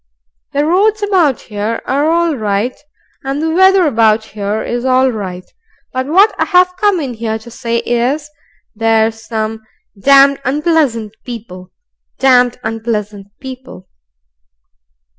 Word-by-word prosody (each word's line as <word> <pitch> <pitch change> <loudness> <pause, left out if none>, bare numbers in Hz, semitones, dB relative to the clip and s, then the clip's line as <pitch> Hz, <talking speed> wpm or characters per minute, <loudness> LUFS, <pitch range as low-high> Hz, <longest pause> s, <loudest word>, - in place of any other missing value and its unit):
"The 285 +1 +1
roads 410 +6 +2
about 355 - +2
here 215 +1 -4
are 285 +4 +1
all 335 -1 +1
right, 215 +1 -1 0.5
and 270 +1 -3
the 320 +1 -1
weather 380 +1 +5
about 225 -5 +2
here 210 0 -4
is 240 0 -3
all 260 0 +3
right, 185 -5 -6 0.5
but 260 +1 -2
what 390 +8 +4
I've 365 -1 +3
come 400 -1 +1
in 270 -5 -4
here 220 -1 -3
to 230 +2 -13
say 235 0 -2
is 255 +6 0 0.5
there's 225 0 +1
some 220 -1 -4 0.3
damned 275 +5 +5
unpleasant 275 -6 0
people 200 -7 -9 0.5
damned 250 -2 +3
unpleasant 215 -3 -4
people!" 260 -8 -10
250 Hz, 125 wpm, -14 LUFS, 220-300 Hz, 0.5 s, weather